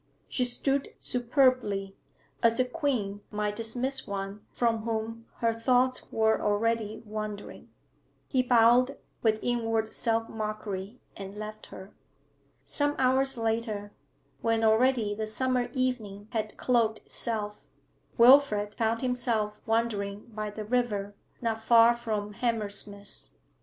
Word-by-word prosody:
She 250 - 0
stood 270 +3 0
superbly, 245 -6 +1 0.5
as 230 0 +3
a 255 - +4
queen 245 -8 -2
might 210 -1 -2
dismiss 245 +5 -1
one 200 +1 -5
from 230 -2 +1
whom 225 +1 -4
her 230 -1 +3
thoughts 250 +2 +1
were 220 0 +2
already 220 +1 0
wandering. 215 -1 -6 0.6
He 260 - +2
bowed, 245 +2 +4 0.2
with 220 -2 +3
inward 225 -2 0
self 225 0 0
mockery, 215 0 -5 0.2
and 195 +1 -8
left 215 0 -7
her. 190 +1 -11 0.7
Some 290 0 +1
hours 265 +1 +2
later, 225 -2 -2 0.5
when 225 -1 +1
already 220 -1 +3
the 215 +1 -3
summer 250 +3 0
evening 220 -6 -2
had 220 -3 -3
cloaked 230 -3 +2
itself, 210 -3 -3 0.5
Wilfrid 235 -5 +6
found 225 +1 0
himself 240 -5 -1
wandering 210 -3 0
by 215 0 -3
the 210 +1 -6
river, 210 -4 0 0.3
not 225 -1 -1
far 230 +1 +6
from 215 -3 -3
Hammersmith. 205 -3 -3
225 Hz, 120 wpm, -29 LUFS, 210-245 Hz, 0.7 s, Wilfrid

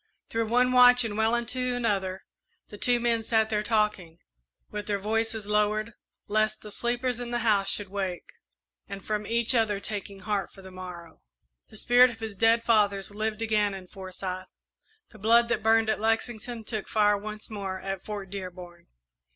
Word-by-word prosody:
Through 225 0 -1
one 250 +2 +3
watch 250 0 +7
and 220 -3 -3
well 220 +2 +2
into 250 +1 -1
another 195 -5 -1 0.4
the 205 - -10
two 245 -1 +3
men 235 -1 +2
sat 220 0 +1
there 210 -1 +1
talking, 210 -6 0 0.5
with 210 0 -5
their 205 -1 0
voices 220 +1 -2
lowered, 210 +1 +1 0.4
lest 215 +1 0
the 210 - -9
sleepers 245 +2 -1
in 245 -1 -5
the 240 - -1
house 200 -3 +3
should 205 -2 -2
wake, 190 -3 -4 0.6
and 200 0 -8
from 210 -1 -2
each 235 +1 +3
other 220 -4 +2
taking 200 -1 -6
heart 205 -2 -2
for 195 - -15
the 190 - -11
morrow. 180 -2 -10 0.5
The 215 - -13
spirit 245 +3 +5
of 230 - -10
his 220 -2 -6
dead 225 +3 +3
fathers 205 -4 +2
lived 215 +1 -2
again 210 -2 +1
in 190 -1 -9
Forsyth; 185 0 -7 0.6
the 215 - -15
blood 235 +3 +4
that 240 - 0
burned 225 +1 +3
at 220 - 0
Lexington 225 +1 -2
took 215 -2 -4
fire 210 -1 +3
once 215 +2 -7
more 195 -3 -4
at 195 -1 -5
Fort 200 -3 -6
Dearborn. 180 -3 -8
215 Hz, 175 wpm, -27 LUFS, 200-230 Hz, 0.6 s, watch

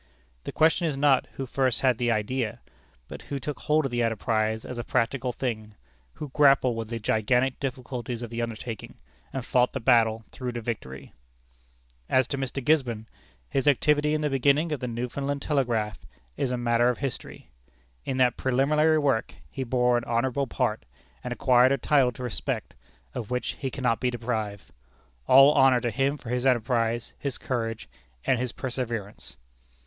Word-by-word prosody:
The - - -4
question 160 +2 +3
is 145 -3 -2
not 140 -2 +3
who 135 - -4
first 130 -1 +1
had 130 -4 +2
the 120 -1 +1
"idea," 115 +1 -1 0.5
but - - -9
who 140 - -5
took 145 +2 -5
hold 155 0 +1
of 135 - -2
the 120 0 0
enterprise 110 -1 0
as 125 - -6
a - - -3
practical 125 +1 0
thing; 110 -4 -4 0.4
who 150 - -7
grappled 135 -3 +4
with 115 -1 -5
the 115 - -3
gigantic 125 +4 +1
difficulties 125 -2 -4
of 120 - -7
the 120 0 -3
undertaking, 115 -1 -6 0.4
and 135 -3 -4
fought 125 0 +2
the 135 - -2
battle 115 -2 +3
through 125 -2 -5
to 120 - -4
victory. 105 - -6 1.0
As 130 -1 +3
to 140 - -2
Mr. 135 -1 -4
Gisborne, 125 -8 +1 0.4
his 135 - -1
activity 150 +2 +3
in 155 - -1
the 150 - 0
beginning 140 +4 +2
of 150 - -2
the 125 - -4
Newfoundland 135 +4 -3
telegraph 115 - 0 0.4
is 135 - -1
a 125 - -1
matter 120 0 +2
of 125 - -1
history. 135 -3 -6 0.5
In 130 - -3
that 125 -2 +3
preliminary 150 +5 +2
work, 140 -7 0 0.2
he 135 - -4
bore 125 -1 +2
an - - -9
honorable 125 +3 0
part, - - -1 0.4
and 125 - -5
acquired 125 +1 +4
a 140 - +2
title 135 -1 +3
to 125 - -8
respect, 125 - -4 0.4
of 110 - -5
which 125 0 -2
he 135 - -2
cannot 125 -4 0
be 125 - +1
deprived. 110 -5 -4 0.5
All 135 +2 +8
honor 135 -3 +5
to 120 -1 -2
him 135 +3 0
for 120 - -10
his 125 +1 0
enterprise, 120 -1 +1
his 140 -3 -3
courage, 115 -3 -3 0.4
and 130 - +2
his 125 -1 -2
perseverance! 115 -4 -5
125 Hz, 175 wpm, -26 LUFS, 115-135 Hz, 1.0 s, All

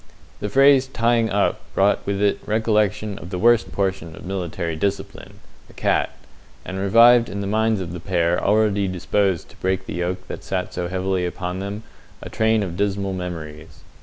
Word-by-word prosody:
The 105 - -3
phrase 135 +3 +5
"tying 115 -2 +1
up" 100 +1 +1 0.2
brought 100 +1 +2
with 100 0 -1
it 100 - +2
recollection 105 -2 0
of 85 - -9
the 90 - -4
worst 115 +3 +3
portion 95 -5 -2
of - - -11
military 85 -3 -3
discipline, 100 +5 -4 0.3
the - - -19
cat, - - +1 0.6
and 95 0 -5
revived 115 +4 +6
in 100 +1 -4
the - - -3
minds 110 0 +1
of 85 -2 -6
the 90 - -6
pair 85 -1 0
already 105 -1 +2
disposed 95 0 0
to - - -18
break 95 0 -1
the - - -6
yoke 90 +2 -3
that - - -7
sat 90 -1 -3
so 90 - -3
heavily 95 0 -1
upon 90 +1 -4
them, 100 +2 -5 0.4
a - - -9
train 110 -1 +2
of 90 -3 -5
dismal 100 0 -1
memories. 80 -4 -7
95 Hz, 180 wpm, -22 LUFS, 90-105 Hz, 0.6 s, revived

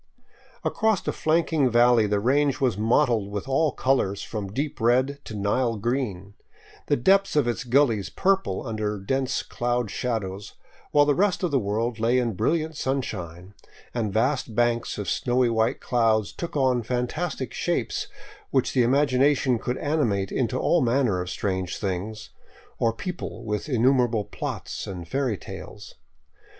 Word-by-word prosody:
Across 220 -4 0
a - - +2
flanking 155 -3 +1
valley 120 -2 +4
the 105 0 +1
range 140 +5 +2
was 130 -6 +1
mottled 115 -1 +2
with 100 +4 -5
all 145 +3 +2
colors 130 -9 0
from 105 -3 -5
deep 140 +3 -3
red 130 +5 +2
to 110 - -7
Nile 115 +3 0
green, 105 -4 -2 0.5
the - - +3
depths 195 +10 +3
of 145 -5 +3
its 120 - -1
gullies 120 -5 +2
purple 195 -5 0
under 105 -3 -2
dense 130 +6 -1
cloud 120 -3 -2
shadows, 105 -5 -3 0.4
while 145 - +5
all - - +6
the 145 - +3
rest 195 +3 +1
of 175 - +1
the 140 - +3
world 110 +2 -2
lay 115 +3 +2
in 120 -3 0
brilliant 160 - 0
sunshine, 95 - -4 0.4
and 110 -4 -1
vast 125 +1 0
banks 120 0 +1
of 105 -2 -4
snowy 125 +4 +1
white 115 +3 +1
clouds 115 -4 +1
took 170 -3 -5
on 130 -3 +2
fantastic 130 +5 -3
shapes - - -1 0.4
which 130 -2 +1
the 130 - +3
imag 140 +5 +3
ination 130 -2 +2
could 125 +1 -2
animate 115 -11 0
into 130 0 0
all 170 +5 +2
manner 120 -6 +2
of 90 - -5
strange 95 -2 -2
beings, 105 +2 -4 0.5
or 115 - +3
people 160 - -6
with 105 +7 -3
innumerable 125 -3 +2
plots 105 - -5
and 90 -3 -6
fairy 130 0 -1
tales. - - -10
120 Hz, 155 wpm, -25 LUFS, 105-135 Hz, 0.5 s, all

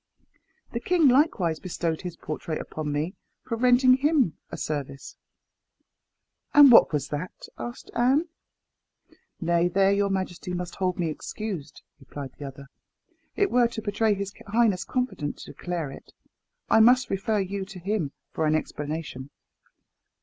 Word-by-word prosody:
The - - -2
king 350 -5 +3
likewise 230 - +2
bestowed 170 -3 -3
his 180 -2 -6
portrait 155 +1 -4
upon 155 -1 -5
me 150 +5 -2 0.3
for 230 - -3
rendering 250 +2 +5
him 275 - +2
a - - -6
service." 140 -2 -5 1.4
"And 290 -3 +10
what 230 - +8
was 145 -3 -2
that?" 150 +5 -6
asked 240 0 -7
Anne. 265 +8 +3 1.1
"Nay, 170 0 +2
there 195 +2 +3
your 200 0 +2
majesty 185 -2 -3
must 175 -1 -5
hold 185 -2 0
me 170 -3 -1
excused," 165 -3 -6 0.2
replied 135 0 -8
the 145 - -6
other. 135 +1 -10 0.7
"It 405 -1 +1
were 245 -1 +4
to 230 -1 -6
betray 210 0 +1
his 200 0 -5
highness's 205 -3 +2
confidence 210 - -3
to - - -10
declare 170 -5 -4
it. - - -13 0.5
I - - +5
must 250 +3 +5
refer 210 +2 0
you 195 0 -2
to 195 -1 -11
him 180 -5 -2 0.2
for 160 - 0
explanation." 150 -2 -3
185 Hz, 140 wpm, -26 LUFS, 155-230 Hz, 1.4 s, And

